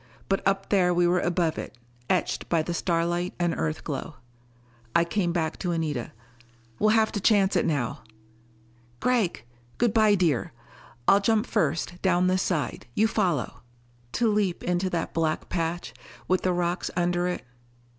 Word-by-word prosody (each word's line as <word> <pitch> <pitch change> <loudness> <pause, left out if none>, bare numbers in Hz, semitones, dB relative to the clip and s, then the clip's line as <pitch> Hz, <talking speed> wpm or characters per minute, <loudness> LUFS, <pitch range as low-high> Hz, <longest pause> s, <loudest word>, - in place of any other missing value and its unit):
But 195 - +1
up 195 0 0
there 180 -3 +3
we 175 0 +3
were 175 +1 +3
above 175 -2 0
it, 130 - -8 0.3
etched 185 - 0
by 165 -2 +2
the 175 - -3
starlight 175 +1 0
and 175 -1 +1
Earthglow. 80 - -3 0.8
I 170 - +5
came 175 0 0
back 160 -2 -2
to 175 -2 -1
Anita. 150 -7 -2 0.7
"We'll 215 - +4
have 220 0 +3
to 205 - -2
chance 200 -1 +3
it - - +2
now." 140 -7 -1 1.0
"Gregg...." 235 -8 +1 0.3
"Good 235 -3 +2
bye, 215 -2 +5
dear. 165 -13 0 0.5
I'll 195 - +7
jump 220 +2 +2
first, 165 - -1
down 180 -1 +3
this 185 0 +2
side, 155 -10 -2
you 220 - +4
follow." 180 - -1 0.5
To 240 - +2
leap 205 -4 0
into 180 +1 0
that 170 -2 -2
black 160 -1 -1
patch, 170 0 -2 0.3
with 185 0 +2
the 185 - +1
rocks 175 0 -1
under 175 0 +1
it.... 180 - -3
175 Hz, 155 wpm, -26 LUFS, 170-195 Hz, 1.0 s, I'll